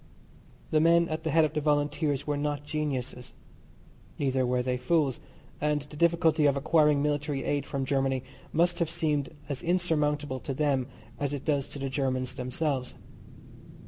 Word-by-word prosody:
The 155 - +4
men 170 +1 +5
at 155 0 -3
the 160 - -1
head 160 +1 +4
of 155 - -3
the 155 - 0
Volunteers 145 -1 +1
were 150 - 0
not 145 0 -2
geniuses, 140 -5 -3 0.8
neither 130 -2 +1
were 125 0 +1
they 125 0 0
fools, 135 +1 +1 0.4
and 150 -1 +1
the 145 +1 -13
difficulty 165 -1 +3
of 140 -1 +2
acquiring 150 0 +3
military 145 -1 -1
aid 145 -1 -1
from 135 -2 -2
Germany 135 -1 0 0.3
must 175 +2 +2
have 170 -2 +1
seemed 155 -4 0 0.2
as 140 -3 -4
insurmountable 150 -6 0
to 135 - -4
them 140 -3 +1 0.3
as 145 0 -1
it 140 - -7
does 145 -3 +1
to - - -9
the 135 0 -3
Germans 130 -2 -1
themselves. 130 +1 -2
145 Hz, 165 wpm, -28 LUFS, 135-155 Hz, 0.8 s, men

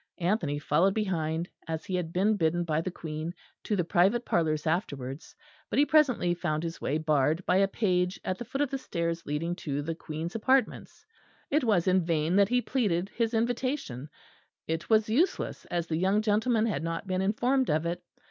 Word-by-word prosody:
Anthony 170 -5 0
followed 165 +6 +2
behind, 170 -5 -1 0.2
as 160 -1 -4
he 190 - -5
had 175 -3 -1
been 200 +5 +2
bidden 175 -2 +1
by 160 -2 0
the 185 - -3
Queen 160 0 -5 0.3
to 210 - -1
the 180 - +1
private 195 +8 +2
parlours 155 -2 0
afterwards; 145 - -3 0.3
but - - -2
he 285 - +6
presently 265 - +3
found 160 -3 -2
his 165 0 -5
way 145 - 0
barred 155 +2 +1
by 180 - +3
a 195 0 +4
page 180 -3 0
at 185 - -2
the - - -3
foot 270 +5 -3
of 290 - 0
the 270 - -2
stairs 170 -6 -3
leading 160 +4 -2
to 145 -4 -3
the 165 +2 -2
Queen's 160 +2 -6
apartments. 260 +4 0 0.5
It 295 +1 +2
was 200 -7 +2
in 185 -1 +4
vain 165 +1 0
that 200 0 +5
he 245 0 +2
pleaded 195 -8 0
his 230 +1 -1
invitation; 235 - -2 0.6
it 165 +1 -3
was 220 -1 +4
useless, 280 - 0
as 175 -1 -2
the 160 -2 -2
young 195 +5 +2
gentleman 220 +1 +2
had 215 - -1
not 165 +3 -3
been 185 -1 -1
informed 245 +7 +1
of 155 +2 +1
it. 175 +1 -2
180 Hz, 195 wpm, -29 LUFS, 160-215 Hz, 0.6 s, he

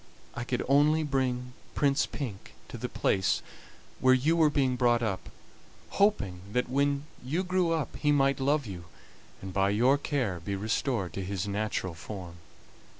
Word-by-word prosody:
I 120 - -4
could 125 0 -1
only 150 +3 +4
bring 130 -3 -1 0.2
Prince 140 0 +2
Pink 115 -10 -7
to - - -7
the - - -3
place 95 -1 +1 0.6
where 130 0 +5
you 150 +6 +2
were 160 -2 +5
being 135 -3 +1
brought 120 -1 +3
up, 100 -4 -3 0.6
hoping 150 - +1
that 125 - +1
when 140 +2 +1 0.2
you 155 +9 -1
grew 180 -2 +1
up 160 -6 -1
he 150 - +2
might 140 -1 +3
love 140 +1 +1
you, 90 -5 -7 0.6
and 95 -1 -6
by 95 0 +2
your 125 +7 +3
care 125 - -1
be 100 +4 -3
restored 110 0 -1
to 95 - -4
his 95 0 -3
natural 100 -3 -2
form. 85 0 -8
125 Hz, 160 wpm, -29 LUFS, 100-145 Hz, 0.6 s, where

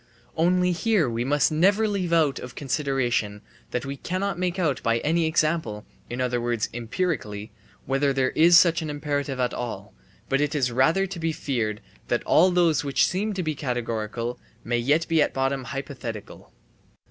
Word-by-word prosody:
Only 180 +2 +2
here 190 - +2
we 115 0 -2
must 145 +4 +2
never 195 +8 +3
leave 195 -4 -2
out 155 -5 +3
of 125 0 -9
consideration 125 -7 -1 0.3
that 125 +2 -3
we 140 0 -5
cannot 185 +4 -3
make 180 0 -1
out 150 - 0
by 115 0 +1
any 165 +1 +1
example, 155 -9 0 0.2
in 120 - -5
other 125 -1 0
words 120 -2 -1
empirically, 115 - -3 0.3
whether 135 +2 +1
there 135 -1 +1
is 170 +2 +6
such 170 -1 +4
an 155 - -4
imperative 145 -2 -2
at 125 -1 0
all, 120 -2 -6 0.3
but 135 +1 +1
it 150 +1 0
is 130 -4 +1
rather 160 +10 +3
to 190 -2 -7
be 165 0 0
feared 115 -8 -2 0.3
that - - 0
all 180 +4 +5
those 175 -4 +2
which 140 -2 +2
seem 205 +4 -1
to 185 - -2
be 155 -1 -1
categorical 120 -3 -3 0.2
may 120 0 0
yet 150 +7 +2
be 165 -2 +3
at - - +1
bottom 135 0 -1
hypothetical. 125 -5 -7
140 Hz, 175 wpm, -25 LUFS, 120-170 Hz, 0.3 s, is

